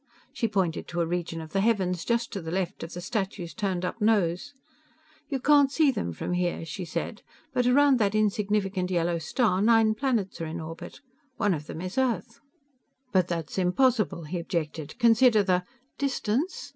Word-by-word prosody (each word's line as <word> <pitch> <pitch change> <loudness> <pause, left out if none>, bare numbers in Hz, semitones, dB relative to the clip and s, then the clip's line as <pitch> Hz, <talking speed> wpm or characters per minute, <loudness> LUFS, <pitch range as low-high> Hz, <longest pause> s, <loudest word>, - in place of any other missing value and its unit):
She 230 - 0
pointed 190 -6 -1
to 175 - -2
a - - +2
region 165 -1 -3
of 160 -1 -10
the 195 - +2
heavens 190 -6 +1
just 235 0 -1
to 195 - -3
the 160 - -6
left 185 +1 -2
of 165 - -6
the 175 - -6
statue's 190 -4 -3
turned 190 -4 -2
up 210 - -5
nose. 210 +2 +1 0.8
"You 275 -3 -1
can't 285 0 +5
see 300 -1 +4
them 85 - -3
from 85 - -4
here," 175 -2 -1
she 175 +4 -5
said, 170 +6 -4 0.3
"but 250 -1 +2
around 275 0 +5
that 205 -1 +1
insignificant 205 -3 0
yellow 170 -1 0
star, 185 - +1
nine 225 0 +5
planets 220 -7 -1
are 165 - -2
in 165 +2 -5
orbit. 160 0 -8 0.4
One 205 -3 +2
of 150 -2 -5
them 160 - -6
is 185 +7 -3
Earth." 235 -3 -1 0.7
"But 185 -2 +3
that's 170 +1 -3
impossible!" 210 -1 +2
he 170 +4 -4
objected. 160 -1 -4
"Consider 235 -2 +5
the 180 -2 +1 0.2
" 270 - -44
"Distance? 275 - -1
195 Hz, 185 wpm, -27 LUFS, 170-230 Hz, 0.8 s, can't